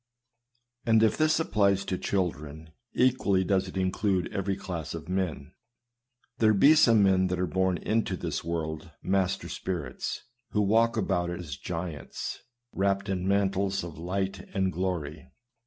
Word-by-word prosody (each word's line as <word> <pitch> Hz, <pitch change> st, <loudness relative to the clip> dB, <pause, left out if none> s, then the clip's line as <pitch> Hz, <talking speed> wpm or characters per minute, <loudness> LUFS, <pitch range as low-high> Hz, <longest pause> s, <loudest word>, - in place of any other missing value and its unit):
And 115 Hz, -1 st, +4 dB
if 110 Hz, -, +3 dB
this 155 Hz, 0 st, +2 dB
applies 100 Hz, -9 st, +2 dB
to 95 Hz, -, -1 dB
children, 80 Hz, -5 st, -3 dB, 0.2 s
equally 120 Hz, -7 st, +2 dB
does 95 Hz, 0 st, +1 dB
it 95 Hz, -, -7 dB
include 95 Hz, 0 st, 0 dB
every 100 Hz, 0 st, -1 dB
class 85 Hz, -5 st, -5 dB
of -, -, -8 dB
men. 90 Hz, -7 st, -2 dB, 0.9 s
There 110 Hz, -1 st, +4 dB
be 140 Hz, +10 st, +7 dB
some 115 Hz, -9 st, +5 dB
men 95 Hz, -1 st, +4 dB
that 90 Hz, 0 st, -2 dB
are 90 Hz, -, +1 dB
born 95 Hz, 0 st, +1 dB
into 110 Hz, +1 st, -1 dB
tins 80 Hz, -4 st, -3 dB
world 80 Hz, -1 st, -4 dB
master 95 Hz, -1 st, 0 dB
spirits, 85 Hz, -9 st, -4 dB, 0.3 s
who 105 Hz, -, +3 dB
walk 115 Hz, +3 st, +3 dB
about 90 Hz, -4 st, 0 dB
it 85 Hz, -, -4 dB
as 75 Hz, -6 st, -6 dB
giants, 80 Hz, -1 st, -5 dB, 0.3 s
wrapped 100 Hz, +1 st, 0 dB
in 95 Hz, -1 st, -1 dB
mantles 100 Hz, -1 st, +1 dB
of 85 Hz, -2 st, -8 dB
light 95 Hz, +2 st, -2 dB, 0.2 s
and 95 Hz, -1 st, +1 dB
glory. 85 Hz, -5 st, -3 dB
95 Hz, 150 wpm, -28 LUFS, 85-100 Hz, 0.9 s, be